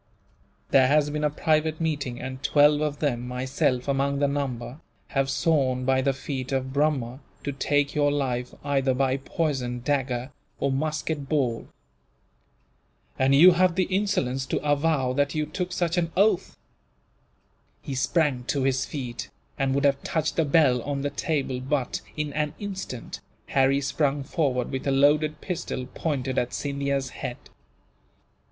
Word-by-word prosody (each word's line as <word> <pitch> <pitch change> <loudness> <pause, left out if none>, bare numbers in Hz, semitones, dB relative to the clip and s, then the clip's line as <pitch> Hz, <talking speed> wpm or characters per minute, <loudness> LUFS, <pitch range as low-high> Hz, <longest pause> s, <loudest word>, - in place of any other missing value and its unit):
There 130 -1 +6
has 145 +1 +3
been 150 0 -2
a 150 - +3
private 155 +1 +1
meeting, 145 -7 -2
and 130 0 -6
twelve 145 +1 +4
of 150 -1 -1
them, 125 -5 -1
myself 125 0 -1
among 140 0 +1
the 140 0 +2
number, 135 -2 -3 0.3
have 135 -1 0
sworn 135 -3 +1
by 130 0 +3
the 135 - +2
feet 135 -1 -5
of 130 -1 -1
Brahma 140 -4 0 0.2
to 140 - -2
take 145 +1 0
your 145 -1 +2
life, 125 -4 -1
either 135 -2 +1
by 135 0 +1
poison, 135 -4 -2
dagger, 130 -1 -1 0.3
or 140 - +1
musket 150 0 -2
ball." 125 -7 0 1.5
"And 135 +1 +4
you 175 +6 +9
have 180 0 +3
the 185 - +3
insolence 180 -10 0
to - - 0
avow 145 -3 +2
that 145 +2 0
you 155 0 0
took 180 +2 -4
such 175 -1 0
an 165 -1 -1
oath!" 200 -2 +2 1.3
He 140 - -5
sprang 135 -1 +1
to 140 +1 0
his 130 0 +1
feet, 125 -5 -5 0.3
and 135 -1 +1
would 140 +1 +1
have 140 -1 +3
touched 160 -1 -1
the 165 - +2
bell 140 -4 +4
on 140 +2 -3
the 145 - -1
table 140 -4 -1
but, 130 0 -1 0.2
in 150 -1 -2
an 150 0 -1
instant, 195 - -6 0.3
Harry 135 +1 +3
sprung 140 0 0
forward 135 -5 -1
with 130 +1 -3
a - - +3
loaded 150 +2 +3
pistol, 160 -8 -4
pointed 135 -5 -1
at 120 - -2
Scindia's 140 -1 -1
head. 120 - -5
140 Hz, 155 wpm, -26 LUFS, 130-150 Hz, 1.5 s, you